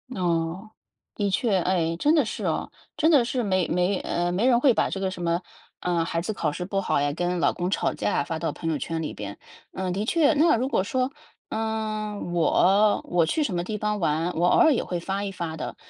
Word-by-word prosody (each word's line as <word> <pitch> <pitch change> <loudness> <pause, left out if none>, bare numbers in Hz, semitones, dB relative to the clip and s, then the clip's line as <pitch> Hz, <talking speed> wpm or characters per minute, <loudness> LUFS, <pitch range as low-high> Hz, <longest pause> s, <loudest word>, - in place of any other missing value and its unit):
哦， 175 +3 -1 0.4
的 205 -1 -1
确， 205 0 +1
哎， 170 -2 0
真 300 - +3
的 300 -6 +3
是 - - -5
哦， - - -2 0.3
真 320 +1 +3
的 285 -6 +6
是 245 +1 -1
没 185 -4 +1
没， 180 +2 +1
呃， 175 0 -1
没 195 +8 +1
人 240 -2 +5
会 260 -1 +5
把 - - +1
这 195 - -4
个 190 -1 -1
什 180 - -7
么， 170 0 +1 0.4
呃， 175 -2 0
孩 165 0 -2
子 185 +6 -3
考 160 -6 -1
试 180 +4 -5
不 195 +1 -1
好 - - +1
呀， 145 0 0
跟 175 +2 -1
老 - - +2
公 175 +1 -2
吵 195 - 0
架 - - -1
啊， - - -1
发 160 +2 -4
到 165 - -1
朋 165 -1 -3
友 155 - 0
圈 165 +4 -3
里 150 - -4
边。 100 -1 -7 0.3
呃， 185 -1 -3
的 200 +4 -2
确。 320 +4 +3
那 305 0 +4
如 250 +3 0
果 230 - +1
说， 255 +5 -1 0.4
嗯， 215 -3 -3
我 195 +5 +3
我 175 -1 +2
去 310 - +1
什 225 - -2
么 175 0 -1
地 210 +4 -4
方 210 0 -1
玩， 165 0 0
我 175 +2 +2
偶 - - +4
尔 320 -4 +6
也 245 - 0
会 175 - -3
发 195 +3 -3
一 200 - -3
发 170 -4 -5
的， 160 - -5
185 Hz, 255 characters per minute, -25 LUFS, 170-220 Hz, 0.4 s, 的